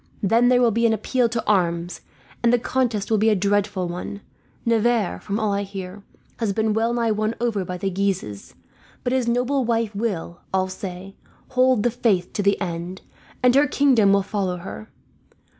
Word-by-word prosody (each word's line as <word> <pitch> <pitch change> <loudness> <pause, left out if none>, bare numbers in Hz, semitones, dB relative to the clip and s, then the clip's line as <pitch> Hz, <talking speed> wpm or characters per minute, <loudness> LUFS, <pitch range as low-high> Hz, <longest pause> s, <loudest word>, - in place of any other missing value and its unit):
Then 230 +5 +4
there 250 0 +4
will 235 - +4
be 230 +2 +2
an 225 - +2
appeal 245 +2 +1
to 230 -1 -3
arms, 175 -4 0 0.4
and 235 - +3
the 245 - +4
contest 235 -4 -1
will 220 - +3
be 220 +2 +4
a 215 - +3
dreadful 200 -1 0
one. 180 +3 -6 0.4
Navarre, 230 -3 +1
from 205 +1 -3
all 215 -2 0
I 200 - 0
hear, 195 0 -7 0.4
has 220 -4 -1
been 220 +1 +1
well 225 +2 +1
nigh 235 -2 +1
won 215 +1 -1
over 230 -5 0
by 180 0 -5
the 195 +2 -2
Guises; 185 - -3 0.5
but 250 - 0
his 255 -2 +1
noble 250 +3 +1
wife 230 -2 0
will, 200 -5 -3
all 190 0 0
say, 190 0 -7 0.4
hold 255 -3 +3
the 240 - +2
faith 215 -7 0
to - - -1
the 200 0 +2
end, 175 0 -4 0.4
and 250 -1 +5
her 285 +2 +5
kingdom 260 -8 +4
will 200 0 +3
follow 190 -3 -2
her. 195 +4 -9
210 Hz, 190 wpm, -23 LUFS, 190-235 Hz, 0.5 s, and